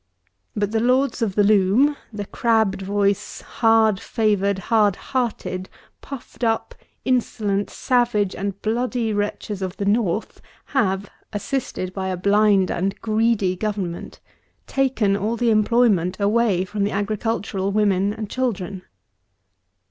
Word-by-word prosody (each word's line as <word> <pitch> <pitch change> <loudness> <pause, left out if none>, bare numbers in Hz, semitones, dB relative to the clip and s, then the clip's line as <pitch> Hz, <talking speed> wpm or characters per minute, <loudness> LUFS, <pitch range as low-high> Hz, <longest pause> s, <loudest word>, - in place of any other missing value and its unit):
But 205 -1 -1
the 225 - +1
Lords 255 +3 +2
of 205 -4 0
the 205 - +4
Loom, 210 +8 +4 0.2
the 205 -2 -5
crabbed 220 -3 +1
voiced, 200 0 -1
hard 225 -3 +3
favoured, 200 -3 +1 0.2
hard 210 -4 +4
hearted, 225 -8 -3 0.3
puffed 270 -2 -9
up, 225 -1 0 0.3
insolent, 210 -5 0
savage 240 -6 +1
and 200 0 -4
bloody 235 0 0
wretches 205 -1 -3
of 185 -1 -4
the 200 - -2
North 210 -1 0 0.3
have, 200 -6 +1 0.3
assisted 205 -4 -3
by 190 -1 -3
a 185 -1 -2
blind 200 0 +3
and 190 +3 -2
greedy 215 -4 +1
Government, 195 -4 -4 0.5
taken 255 -7 +1
all 215 +4 -1
the 235 0 +2
employment 215 -5 +2
away 205 -3 +2
from 205 +1 -2
the 200 - +1
agricultural 205 -1 -2
women 200 -1 +2
and 215 0 -5
children. 200 -6 -3
210 Hz, 125 wpm, -22 LUFS, 195-230 Hz, 0.5 s, the